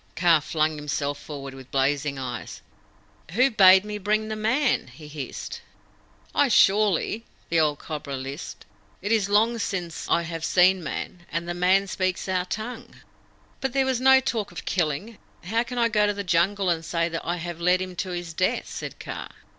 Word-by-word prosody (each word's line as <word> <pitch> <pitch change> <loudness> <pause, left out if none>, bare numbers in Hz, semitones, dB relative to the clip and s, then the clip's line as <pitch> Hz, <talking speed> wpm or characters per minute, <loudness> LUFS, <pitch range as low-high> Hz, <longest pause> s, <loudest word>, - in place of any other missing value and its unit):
Kaa 170 -1 +5
flung 155 +1 0
himself 145 -1 -2
forward 140 -3 -8
with 130 -1 -12
blazing 140 +1 0
eyes. 125 -3 -6 0.7
"Who 255 +6 +4
bade 190 -2 +7
me 210 0 -5
bring 215 +2 0
the 215 - -2
Man?" 230 - +1
he 135 +5 -12
hissed. 150 -2 -6 0.7
"I 285 - +4
surely," 210 -1 +3 0.3
the 165 - +3
old 150 -2 +2
Cobra 145 -3 -5
lisped. 135 +4 -7 0.4
"It 205 - -1
is 210 -3 +2
long 225 +3 +3
since 180 -5 -4
I 170 - +3
have 165 -1 -5
seen 185 +2 +4
Man, 175 +4 -6
and 170 +2 -2
this 175 - -3
Man 185 +2 +3
speaks 185 -1 -2
our 185 -1 0
tongue." 220 +6 -6 0.6
"But 265 -2 -2
there 270 -1 +2
was 260 -2 0
no 265 0 +7
talk 230 -7 -2
of 175 - -8
killing. 180 +6 -2 0.2
How 225 +6 0
can 245 +1 -5
I 235 -1 +4
go 210 -2 +2
to 205 - 0
the 200 - -3
Jungle 185 +2 +2
and 165 -1 -1
say 170 0 0
that 165 0 -4
I 175 - -1
have 170 -1 -6
led 180 +1 +4
him 185 -1 -5
to 185 - -2
his 175 -2 -5
death?" 185 +3 0
said - - -6
Kaa. - - -6
180 Hz, 185 wpm, -25 LUFS, 160-210 Hz, 0.7 s, bade